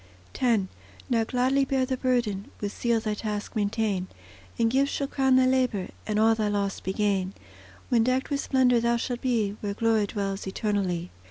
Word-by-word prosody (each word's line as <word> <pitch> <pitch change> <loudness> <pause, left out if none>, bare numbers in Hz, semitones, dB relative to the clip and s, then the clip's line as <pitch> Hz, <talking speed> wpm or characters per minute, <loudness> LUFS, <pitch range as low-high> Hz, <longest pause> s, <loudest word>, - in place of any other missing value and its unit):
X 230 -5 +3 0.5
Now 230 -2 +3
gladly 260 +3 +2
bear 265 -1 +1
the 260 0 -1
burden; 240 -6 0
With 205 -1 -4
zeal 235 -1 +1
thy 215 -1 -2
task 210 +1 -4
maintain, 205 -3 0 0.5
And 230 -1 +2
gifts 275 +2 +2
shall 280 - -1
crown 265 -1 +2
thy 260 0 +5
labour, 255 -7 +1 0.2
And 210 -1 0
all 220 +1 +5
thy 220 -1 0
loss 200 -1 -1
be 190 - -3
gain, 195 -2 0 0.5
When 235 -2 +4
decked 255 +4 0
with 280 - 0
splendour 255 -3 +3
thou 235 0 +2
shalt 240 +1 -3
be, 220 -6 0
Where 200 -1 -3
glory 225 -2 +2
dwells 195 -2 -3
eternally. 190 -4 -1
225 Hz, 180 wpm, -27 LUFS, 205-255 Hz, 0.5 s, thy